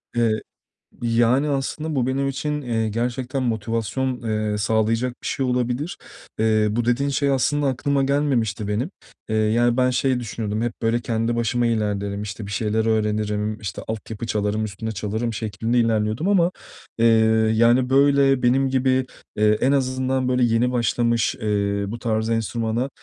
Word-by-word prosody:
Eee, 115 -2 +1 0.6
yani, 120 +5 +2
aslında 145 +3 -2
bu 125 -2 +1
benim 135 +1 0
için, 150 +2 -3
eee, 115 -4 -1
gerçekten 125 +4 -2
motivasyon, 115 +3 -2
eee, 110 -2 -1
sağlayacak 110 +3 +1
bir - - -3
şey 135 - -1
olabilir. 125 +5 -1 0.4
Eee, 110 -1 +3
bu 115 +2 -1
dediğin 125 +4 +1
şey 140 +1 +1
aslında 145 +2 +1
aklıma 135 +1 0
gelmemişti 130 -7 0
benim, 115 - -2 0.4
eee, 110 - 0
yani, 115 +3 +2
ben 130 0 +3
şey 130 0 +1
düşünüyordum: 110 -2 -3
Hep 120 -1 -1
böyle 115 +1 +1
kendi 115 0 -1
başıma 120 +1 0
ilerlerim, 105 -3 -1
işte, 105 0 -6
bir 100 - -8
şeyler 110 +1 0
öğrenirim, 105 -1 0
işte, 100 -6 -5
altyapı 110 0 -5
çalarım, 105 0 -1
üstüne 110 +2 -5
çalarım 110 +3 -3
şeklinde 110 +2 -2
ilerliyordum 110 - +1
ama, 180 -3 +3 0.5
eee, 115 - +3 0.5
yani, 120 +3 +3
böyle, 135 -1 +4
benim 135 +2 +3
gibi, 130 0 +1 0.3
eee, 105 0 +3
en 130 - +3
azından, 130 -1 0
böyle, 125 0 +2
yeni 120 +1 +2
başlamış, 120 -2 +1
eee, 100 -1 0
bu 115 +3 -5
tarz 110 -1 -1
enstrümana, 115 +2 -1
115 Hz, 155 wpm, -22 LUFS, 110-130 Hz, 0.6 s, böyle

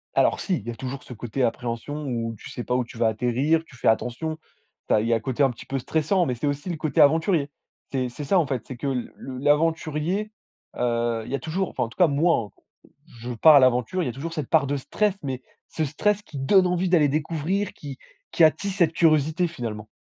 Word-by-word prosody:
Alors - - +3
si, 190 - 0
il 110 - -10
y 120 - -2
a - - -8
toujours 130 +2 -6
ce - - -10
côté 120 +3 -3
appréhension 120 +5 -3
où 115 -3 -3
tu - - -10
sais 120 - -6
pas 125 - -1
où 125 - +1
tu 115 - -12
vas 115 - +3
atterrir, 125 +8 +1
tu 135 - -17
fais 120 - -3
attention. 125 +8 0 0.5
Tu - - +2
as 105 - +3
il 110 - -2
y 115 - +3
a - - +4
un - - -5
côté 130 +4 -1
un 135 - +4
petit 120 - -11
peu 135 - -3
stressant, 160 +7 +1
mais 125 -5 -1
c'est 145 +5 -2
aussi 145 +5 -3
le 170 - -3
côté 150 -3 +1
aventurier. 160 0 +3 0.4
C'est 130 -2 -1
c'est 145 +5 -7
ça 185 +6 +3
en 155 - +1
fait, 130 -4 -2
c'est 130 - -7
que 140 - -4
l 125 -3 -2
le 130 -1 -8
l'aventurier, 160 +6 0 0.5
heu, 115 -2 0
il - - -8
y 140 - +1
a - - -3
toujours 180 +4 -2
enfin, - - -2
en 115 - -4
tout - - -17
cas 180 - +6
moi, 145 -7 +1 0.4
hein, - - -24 0.3
je 125 +1 -5
pars 150 +7 +6
à 140 - +8
l'aventure, 130 +8 +2
il - - -2
y - - -1
a - - -3
toujours 160 +6 -6
cette 150 -6 -4
part 155 -4 +4
de 145 +1 -1
stress, 205 +9 0
mais 130 -2 -4 0.3
ce 160 - -2
stress 205 +8 0
qui 145 - -9
donne 185 +8 +4
envie 180 +1 0
d'aller 160 -5 +4
découvrir, 165 +6 -1
qui 140 -3 -9 0.3
qui 170 - +5
attise 185 +5 +2
cette 170 -5 +3
curiosité 160 +1 +2
finalement. 110 -8 -6
145 Hz, 250 wpm, -24 LUFS, 125-165 Hz, 0.5 s, à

